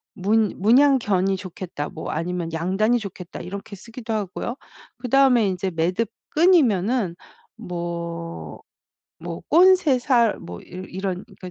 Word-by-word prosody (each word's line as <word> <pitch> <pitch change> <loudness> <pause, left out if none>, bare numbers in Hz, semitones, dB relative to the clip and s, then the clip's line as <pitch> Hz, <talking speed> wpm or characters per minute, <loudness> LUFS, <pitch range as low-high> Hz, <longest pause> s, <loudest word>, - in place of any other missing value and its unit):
문 210 +1 +2
'문양견이 215 -5 +4
좋겠다.' 180 -5 -6
뭐 - - -6
아니면 170 0 -3
'양단이 195 +8 +1
좋겠다.' 190 -4 -8
이렇게 200 +3 -7
쓰기도 230 +2 -7
하고요. 215 +4 -3 0.4
그다음에 250 -3 +4
인제 185 0 -2
매듭 180 +7 0 0.2
끈이면은 245 - +3 0.4
뭐 170 - -6 0.6
뭐 165 0 -6
꼰새살 280 - +4
뭐 85 0 -9
이러 185 +1 -9
이런 190 0 -4
그러니까 185 - -8
195 Hz, 275 characters per minute, -23 LUFS, 175-235 Hz, 0.6 s, 문양견이